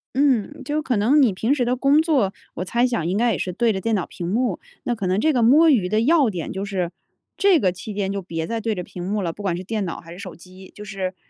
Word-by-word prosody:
嗯， 265 -3 +1
就 295 +3 -1
可 255 -4 0
能 265 +9 +4
你 225 - +3
平 225 +9 +1
时 250 -4 0
的 245 +1 +1
工 275 +4 +3
作， 275 - +1 0.2
我 180 - -4
猜 240 +6 +1
想 235 -10 -1
应 185 +3 0
该 235 +1 +2
也 - - -1
是 185 - -3
对 225 +4 +1
着 190 - -3
电 225 +3 0
脑 185 - -1
屏 170 - -7
幕。 220 +1 0 0.2
那 245 - -1
可 205 -5 -3
能 185 +2 +1
这 310 +7 +2
个 245 - +2
摸 295 +8 +6
鱼 195 -9 +2
的 215 +2 +2
要 290 0 +4
点 175 -6 -5
就 190 - -4
是， 185 -4 -2 0.4
这 390 -5 +4
个 185 -5 +2
期 205 +4 -8
间 195 -1 -1
就 200 0 -3
别 165 -2 -4
再 230 +4 -3
对 225 -1 -1
着 180 - -4
屏 175 0 -8
幕 200 +3 -1
了， 165 - -2
不 205 - -10
管 185 -4 -1
是 180 - -6
电 210 0 -2
脑 170 - -5
还 165 0 -13
是 175 - -10
手 190 -3 -8
机。 185 +2 -15
就 210 - -9
是， 190 -2 -4
210 Hz, 310 characters per minute, -22 LUFS, 185-250 Hz, 0.4 s, 摸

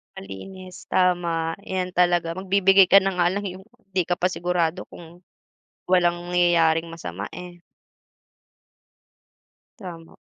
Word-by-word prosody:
Malinis 180 - -10
tama 170 -3 0
'yan 185 -1 -3
talaga 175 -2 +2
magbibigay 195 0 +4
ka 195 +1 +7
na 195 - 0
nga 175 -1 +3
lang 205 +1 -3
yung 190 +1 -9
pang 240 0 -32
'di 190 -1 +1
ka 175 - +1
pa 180 +1 0
sigurado 175 -1 -2
kung 170 +1 -14 0.7
walang 175 -1 +2
nangyayaring 170 -2 +2
masama, 100 - -7
eh. 175 0 -10 2.2
Tama. 170 -6 -11
175 Hz, 120 wpm, -23 LUFS, 165-185 Hz, 2.2 s, ka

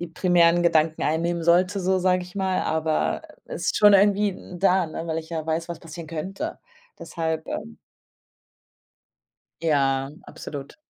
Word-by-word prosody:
die 175 - -5
primären 175 0 +3
Gedanken 160 -1 +2
einnehmen 170 +2 0
sollte 180 +4 +3
so 185 +1 +1
sag 180 0 +2
ich 180 +1 -12
mal, 190 -1 0
aber 160 0 -1 0.2
ist - - -2
schon 205 -1 +7
irgendwie 205 +1 +4
n 180 -1 -10
da, 185 -3 +2 0.2
weil 160 0 -2
ich 160 - -8
ja 160 -1 -4
weiß, 165 +1 -2
was 170 - -6
passieren 165 0 -9
könnte. 195 - -5 0.4
Deshalb, 160 -2 -3
ähm 75 0 -6 1.8
Ja, 135 -3 +1
absolut. 140 -2 -8
170 Hz, 145 wpm, -24 LUFS, 160-185 Hz, 1.8 s, schon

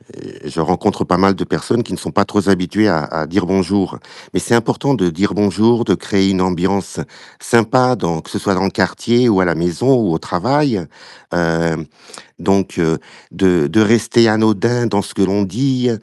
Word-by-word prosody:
heu, - - -14
je - - -7
rencontre - - 0
pas 90 - +1
mal 95 +1 +3
de - - -4
personnes - - -1
qui - - -8
ne - - -5
sont - - -6
pas 100 - +2
trop 105 +1 0
z 100 - -2
habituées 100 +3 +2
à 80 -6 +1
à 80 +2 -4
dire: 95 +3 -1
«Bonjour». 95 +1 0 0.3
Mais - - 0
c'est 120 - +1
important 135 +4 0
de 90 -7 0
dire 100 +5 -1
bonjour, 110 +4 +2
de 100 - +2
créer 95 +1 0
une 95 -1 0
ambiance 95 +1 -1 0.4
sympa 125 +2 +2
dans 85 -7 -3
que - - -14
ce - - -3
soit 100 - 0
dans 95 - 0
le 95 - 0
quartier 120 +1 +1
ou 100 -4 +3
à 95 - +3
la 85 - +1
maison 90 - +1
ou 110 -9 +1
au - - 0
travail, 120 - -1 0.5
hem, 80 -1 -1 0.5
donc 95 -2 0 0.5
de 90 -6 +2
de 110 - +2
rester 115 +2 +3
anodin 110 +2 +1
dans 100 -2 0
ce 100 - -10
que - - -2
l'on 100 +2 +1
dit, 125 +5 -1
100 Hz, 200 wpm, -16 LUFS, 90-115 Hz, 0.5 s, mal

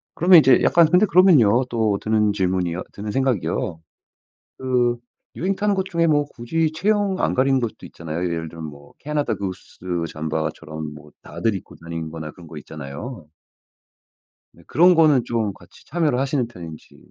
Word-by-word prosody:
그러면 175 +1 +7
이제 135 -4 +5
약간 170 -2 +5
근데 180 +5 +5
그러면요. 150 - +5
또 110 -4 +1
드는 105 -1 +2
질문이요 90 -3 -1
드는 105 +1 -6
생각이요. 125 -10 -1 0.8
그 125 -2 +1 0.4
유행 195 +3 -1
타는 205 +1 0
것 190 -1 -1
중에 170 -3 0
뭐 145 -2 +2
굳이 150 +5 -2
체형 200 +2 0
안 - - +1
가리는 135 +1 +2
것도 115 -3 -5
있잖아요. 85 +1 -6
예를 80 -2 -3
들면 80 0 -8
뭐 70 -1 -12
캐나다 145 -6 -2
구스 95 -2 -7 0.3
잠바처럼 80 0 -4
뭐 75 0 -14
다들 90 +7 -2
입고 95 - -9
다니는 80 -1 -6
거나 80 -1 -7
그런 85 0 -15
거 80 - -10
있잖아요. 75 - -8 1.3
네. 85 - -20
그런 180 +2 +5
거는 150 -7 +4
좀 110 -3 -1
같이 85 -1 -19
참여를 155 -7 0
하시는 135 -2 0
편인지. 85 -8 -11
115 Hz, 340 characters per minute, -22 LUFS, -, 1.3 s, 그러면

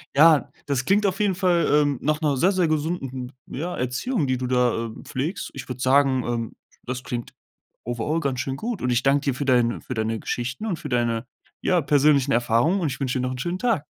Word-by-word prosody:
Ja, 155 0 +6 0.2
das 135 -3 -1
klingt 205 +2 +3
auf 195 -1 0
jeden 205 -3 +2
Fall, 175 -2 +2
ähm, 145 -3 +3
nach 150 +2 0
'ner 145 -4 +1
sehr, 190 +8 +3
sehr 180 -3 +2
gesunden 140 -5 -2
ja, 175 +6 -4
Erziehung, 140 - -1
die 130 -1 0
du 125 - -3
da, 125 -2 +1
äh, 115 - -5
pflegst. 150 +9 -3
Ich - - -8
würde 125 0 -6
sagen, 130 -1 +3
ähm, 115 -1 -3 0.3
das 125 +1 -4
klingt 120 -2 -5 0.5
overall 120 +8 -2
ganz 135 -5 -1
schön 130 +2 -2
gut. 225 - -4
Und 125 - 0
ich 120 +1 +1
danke 140 +1 +3
dir 140 - +1
für 130 - -3
deine 125 -3 +2
für - - -6
deine 110 -1 -1
Geschichten 130 - -3
und 185 -7 -2
für 150 - -6
deine, 120 -2 0 0.3
ja, 180 -2 +2
persönlichen 140 -1 +3
Erfahrungen 120 - +2
und 165 - 0
ich 130 - -5
wünsche 130 -1 0
dir 125 - -1
noch 130 - -1
'nen 130 - -7
schönen 175 +7 -2
Tag. 230 -12 +1
135 Hz, 225 wpm, -24 LUFS, 125-165 Hz, 0.5 s, Ja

